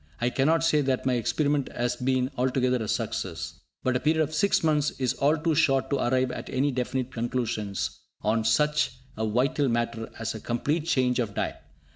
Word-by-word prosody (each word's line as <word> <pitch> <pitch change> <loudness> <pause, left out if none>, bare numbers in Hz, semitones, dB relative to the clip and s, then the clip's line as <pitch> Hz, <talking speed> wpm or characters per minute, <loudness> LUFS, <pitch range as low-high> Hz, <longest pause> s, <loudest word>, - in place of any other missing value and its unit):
I 120 +1 +1
cannot 155 +6 +2
say 150 -2 +3
that 130 -2 0
my 130 - +2
experiment 140 +4 0
has 120 0 0
been 130 +1 0
altogether 125 0 +1
a - - -4
success, 85 -8 -3 0.2
but 130 0 +1
a - - +2
period 155 +3 +2
of 155 +1 -4
six 180 +5 +2
months 150 -2 +3
is 130 -2 +1
all 145 +3 +2
too 160 +1 +1
short 135 -4 +2
to 140 - +2
arrive 130 +1 +1
at - - -6
any 140 +3 +1
definite 130 0 -2
conclusions 115 -4 -2 0.2
on 110 +2 +2
such 150 +7 +2 0.2
a 110 0 -1
vital 135 +5 +1
matter 115 -1 -1
as 115 - -3
a 110 - -6
complete 145 +8 -1
change 125 -4 +2
of 105 -5 -2
diet. - - -2
130 Hz, 190 wpm, -27 LUFS, 120-145 Hz, 0.2 s, say